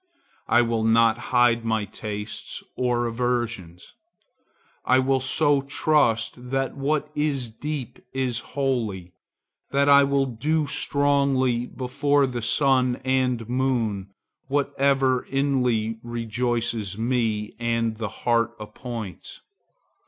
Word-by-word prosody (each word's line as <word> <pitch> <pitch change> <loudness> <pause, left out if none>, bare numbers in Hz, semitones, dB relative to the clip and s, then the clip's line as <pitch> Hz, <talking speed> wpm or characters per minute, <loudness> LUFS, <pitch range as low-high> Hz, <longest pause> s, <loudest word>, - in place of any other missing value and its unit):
I 120 +1 +4
will 115 -1 -1
not 115 +1 +4
hide 120 -2 +3
my 110 -2 0
tastes 105 0 -6
or 120 -1 0
aversions. 115 -7 -3 0.9
I 130 - +4
will 130 +1 +2
so 140 +2 +2
trust 125 -4 +1
that 135 0 -1
what 150 +2 -1
is 140 -6 -1
deep 140 +1 -5
is 130 -3 -1 0.2
holy, 110 -10 -1 0.6
that 140 +1 +2
I 140 0 +7
will 140 0 +2
do 150 +6 0
strongly 140 -4 +2
before 140 +2 +1
the 125 -2 -4
sun 130 +1 +2
and 130 -3 0
moon 120 -6 -1 0.4
whatever 135 -2 +1
inly 125 -5 0
rejoices 115 -3 -2
me 115 -3 -1
and 115 -1 0
the 110 -2 -3
heart 115 +1 0
appoints. 105 -3 -8
125 Hz, 110 wpm, -24 LUFS, 115-135 Hz, 0.9 s, I